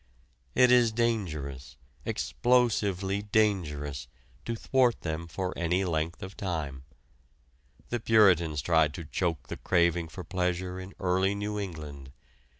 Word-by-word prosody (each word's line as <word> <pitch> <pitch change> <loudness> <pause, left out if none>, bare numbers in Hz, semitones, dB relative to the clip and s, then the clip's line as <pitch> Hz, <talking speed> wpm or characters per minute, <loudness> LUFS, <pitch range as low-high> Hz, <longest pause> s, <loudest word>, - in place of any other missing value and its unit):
It 125 0 +6
is 120 -2 +5
dangerous, 75 - -2 0.3
explosively 100 -6 +1
dangerous, 90 -10 0 0.4
to 115 - -2
thwart 125 +1 +2
them 80 0 -4
for 90 +2 -4
any 90 +3 0
length 80 0 -2
of 95 +1 -8
time. 75 -9 -4 1.0
The 120 - -1
Puritans 90 - +4
tried 80 -3 +3
to 85 - -6
choke 85 +1 -2
the - - -6
craving 85 -2 +2
for 90 +3 -8
pleasure 90 0 -2
in 95 +1 -9
early 95 +2 +1
New 105 +1 -3
England. 75 -8 -7
90 Hz, 125 wpm, -29 LUFS, 80-105 Hz, 1.0 s, It